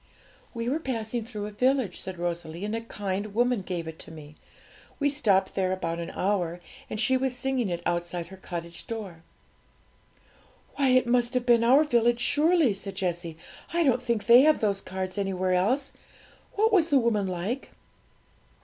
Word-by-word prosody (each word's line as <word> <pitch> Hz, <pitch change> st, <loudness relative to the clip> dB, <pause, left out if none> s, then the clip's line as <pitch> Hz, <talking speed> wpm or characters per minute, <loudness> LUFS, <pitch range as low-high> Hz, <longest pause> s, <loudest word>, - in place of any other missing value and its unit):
'We 230 Hz, 0 st, -3 dB
were 295 Hz, +5 st, 0 dB
passing 235 Hz, -5 st, -3 dB
through 210 Hz, -3 st, -6 dB
a 210 Hz, -, -6 dB
village,' 250 Hz, -3 st, +1 dB
said 190 Hz, -1 st, -6 dB
Rosalie, 170 Hz, +1 st, -4 dB
'and 210 Hz, +2 st, -2 dB
a 230 Hz, -, -3 dB
kind 205 Hz, -2 st, -4 dB
woman 245 Hz, -2 st, +2 dB
gave 175 Hz, -3 st, -4 dB
it 160 Hz, 0 st, -8 dB
to -, -, -10 dB
me. 155 Hz, -2 st, -11 dB, 0.7 s
We 285 Hz, -1 st, +2 dB
stopped 200 Hz, -10 st, +2 dB
there 185 Hz, -1 st, 0 dB
about 170 Hz, -3 st, -2 dB
an 170 Hz, -, -5 dB
hour 180 Hz, -3 st, -1 dB, 0.3 s
and 215 Hz, -, -4 dB
she 260 Hz, +4 st, +3 dB
was 260 Hz, -1 st, -1 dB
singing 255 Hz, -4 st, -1 dB
it 175 Hz, -1 st, -3 dB
outside 175 Hz, 0 st, -2 dB
her 190 Hz, -, -11 dB
cottage 170 Hz, -2 st, -7 dB
door.' 205 Hz, -8 st, -6 dB, 1.5 s
'Why 280 Hz, -2 st, +2 dB
it 255 Hz, 0 st, +4 dB
must 240 Hz, +1 st, +1 dB
have 250 Hz, -1 st, 0 dB
been 235 Hz, -1 st, +4 dB
our 265 Hz, +6 st, +6 dB
village, 240 Hz, -4 st, +2 dB
surely!' 300 Hz, -, +3 dB
said 195 Hz, 0 st, -7 dB
Jessie; 175 Hz, -3 st, -3 dB, 0.4 s
'I 340 Hz, -, +3 dB
don't 250 Hz, -4 st, +2 dB
think 235 Hz, -4 st, -1 dB
they 240 Hz, +2 st, +8 dB
have 305 Hz, +2 st, +4 dB
those 200 Hz, -2 st, 0 dB
cards 185 Hz, +1 st, -4 dB
anywhere 185 Hz, -2 st, 0 dB
else. 245 Hz, +10 st, +1 dB, 0.6 s
What 440 Hz, +2 st, +2 dB
was 340 Hz, -5 st, +4 dB
the 285 Hz, -, +4 dB
woman 225 Hz, -5 st, +1 dB
like?' 185 Hz, +9 st, -3 dB
215 Hz, 175 wpm, -27 LUFS, 185-250 Hz, 1.5 s, they